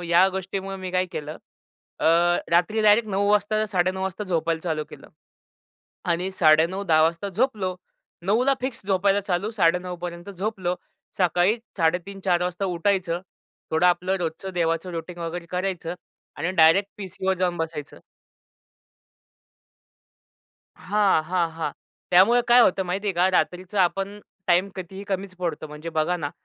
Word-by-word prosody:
अ, - - -6
या 175 +3 +5
गोष्टीमुळे 190 +1 -4
मी 185 -1 -6
काय 185 0 +1
केलं, 150 0 -5 0.6
अ, - - -2 0.5
रात्री 180 +6 +2
डायरेक्ट 215 +1 +5
09:00 200 0 0
वाजता 210 +1 +2
09:30 185 -1 0
वाजता 190 +2 -3
झोपायला 165 -3 -1
चालू 155 -3 -2
केलं - - -12 1.0
आणि 180 +3 -2
09:30-10:00 165 +1 +3
वाजताच 170 +5 0
झोपलो. 215 -7 0 0.5
09:00 215 +6 +2
ला 275 0 +4
फिक्स 260 -1 -4
झोपायला 195 +1 +2
चालू. 185 +3 0
09:30 180 -3 +1
पर्यंत 175 +2 -6
झोपलो. 190 -2 -2 0.4
सकाळी 180 +3 +3 0.2
03:30-04:00 180 +2 0
वाजता 180 +2 -2
उठायचं. 180 -1 0 0.5
थोडं 160 +3 +3
आपलं 180 +2 +2
रोजचं 175 +2 -4
देवाचं 165 +1 0
रुटीन 170 +1 -6
वगैरे 170 0 -5
करायचं 180 -2 -3 0.4
आणि 165 +5 -1
डायरेक्ट 185 +4 +5
पीसीवर 190 0 -2
जाऊन 180 -1 0
बसायचं. 165 -3 -5 2.8
हां, 200 -4 +2
हां, 175 0 0
हां. 165 0 -3 0.4
त्यामुळे 195 +7 +6
काय 245 +1 +7
होतं 190 -4 +4
माहिती 185 +3 -3
आहे 200 - +1
का? 180 +2 +3
रात्रीचं 180 +3 -1
आपण 195 +3 0 0.3
टाईम 180 +2 +3
कितीही 190 +2 -7
कमीच 195 -1 -4
पडतो. 170 -4 -3
म्हणजे 150 +2 -8
बघा 175 +3 +1
ना 145 -4 -4
180 Hz, 140 wpm, -24 LUFS, 170-195 Hz, 2.8 s, काय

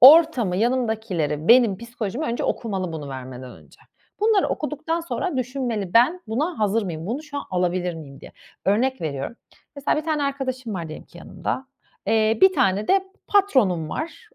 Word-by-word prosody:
Ortamı, 265 - +8
yanımdakileri, 220 - 0
benim 235 -4 +6
psikolojimi 235 +3 -4
önce 235 - -2
okumalı 190 -6 -2
bunu 150 -3 -6
vermeden 130 -1 -7
önce. - - -18 0.4
Bunları 425 -2 +3
okuduktan 310 +2 -2
sonra 335 -1 -3
düşünmeli, 245 -7 -2
ben 255 +11 +5
buna 300 +10 -1
hazır 215 +1 +2
mıyım, 170 -3 -5
bunu 250 +8 -3
şu 295 -2 -8
an - - -5
alabilir 180 -1 0
miyim, 140 -4 -10
diye. - - -12 0.3
Örnek 250 +7 +2
veriyorum, 145 - -4 0.4
mesela, 280 +2 +1
bir 305 - -2
tane 310 -2 0
arkadaşım 260 -5 -2
var, 170 -3 -4
diyelim 155 - -8
ki - - -15
yanımda, 265 - -4 0.4
eee, 220 0 +3
bir 380 0 +7
tane 195 - +1
de 385 0 +4 0.2
patronum 255 - +3
var, 335 - -6
230 Hz, 165 wpm, -23 LUFS, 180-285 Hz, 0.4 s, Ortamı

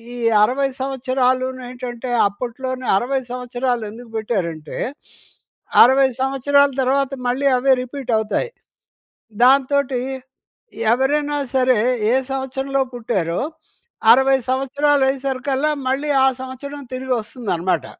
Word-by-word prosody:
ఈ - - -7 0.3
60 270 +5 +1
సంవత్సరాలూనేంటంటే, 255 -1 -2 0.2
అప్పట్లోనే 250 +4 -5
60 265 +5 -1
సంవత్సరాలు 250 -1 -2
ఎందుకు 230 +1 -12
పెట్టారంటే, 170 -9 -3 1.1
60 265 +2 +5
సంవత్సరాల 280 +1 +3
తర్వాత 270 +1 +1 0.2
మళ్ళీ 265 +3 +1
అవే 270 +2 +2
రిపీటవుతాయి. 250 - -2 0.9
దాంతోటీ 270 0 +3 0.9
ఎవరైనా 290 +3 0 0.2
సరే, 255 -3 +3 0.3
ఏ - - +4 0.2
సంవత్సరంలో 270 +1 -2
పుట్టారో, 190 -8 -2 0.7
60 265 +2 +4
సంవత్సరాలయ్యేసరికల్లా 270 0 +1 0.2
మళ్ళీ 280 +3 -1 0.2
ఆ - - +5
సంవత్సరం 280 +3 -7
తిరిగి 260 0 -5
వస్తుందనమాట. 190 - -2
260 Hz, 90 wpm, -20 LUFS, 245-270 Hz, 1.1 s, 60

